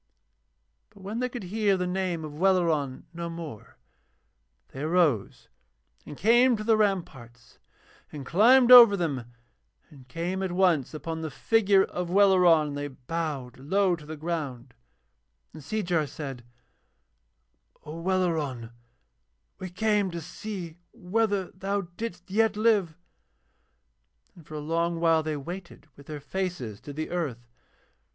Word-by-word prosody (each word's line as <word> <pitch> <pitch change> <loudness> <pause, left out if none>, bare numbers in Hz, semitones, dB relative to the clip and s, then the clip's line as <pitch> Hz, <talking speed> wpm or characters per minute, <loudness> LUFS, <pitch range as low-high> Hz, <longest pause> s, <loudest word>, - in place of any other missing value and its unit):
But 200 -2 -18
when 210 +4 -4
they 250 0 -1
could 245 -3 -7
hear 200 +1 +1
the 180 - -2
name 180 -3 -2
of 150 0 -9
Welleran 165 -8 +1
no 170 0 -5
more 165 -9 -9 0.9
they 135 - -9
arose 155 - 0 0.6
and 145 - -9
came 240 +3 +4
to 215 - -5
the 225 0 +3
ramparts 140 - -3 0.5
and 145 -3 -8
climbed 240 - +5
over 235 -5 +10
them 145 -9 -2 0.7
and 135 -4 -16
came 170 +7 -3
at 190 -2 -2
once 175 -7 +2
upon 160 +1 -5
the 160 - -4
figure 200 +5 +3
of 180 -2 -4
Welleran, 180 -5 +4
and 145 - -5
they 145 - -3
bowed 135 -2 -5
low 185 +6 +1
to 150 -3 -14
the 155 0 -7
ground, 145 -7 -5 0.8
and 155 - -10
Seejar 170 -2 -1
said: 135 -4 -8 1.4
'O 155 +2 -7
Welleran, 160 -10 -1 0.9
we 185 - -6
came 205 +1 +1
to 170 -1 -5
see 175 0 -7 0.2
whether 205 -2 -1
thou 195 +2 -2
didst 185 -4 -7
yet 215 0 +2
live.' 210 -7 +2 1.4
And 170 -4 -17
for 155 - -9
a - - -4
long 165 +2 -1
while 165 -1 +3
they 155 -1 -3
waited 175 +5 -9
with 140 - -16
their 150 -1 -6
faces 145 - -4
to 145 - -9
the 155 +2 -5
earth. 140 -9 -3
170 Hz, 140 wpm, -27 LUFS, 150-195 Hz, 1.4 s, over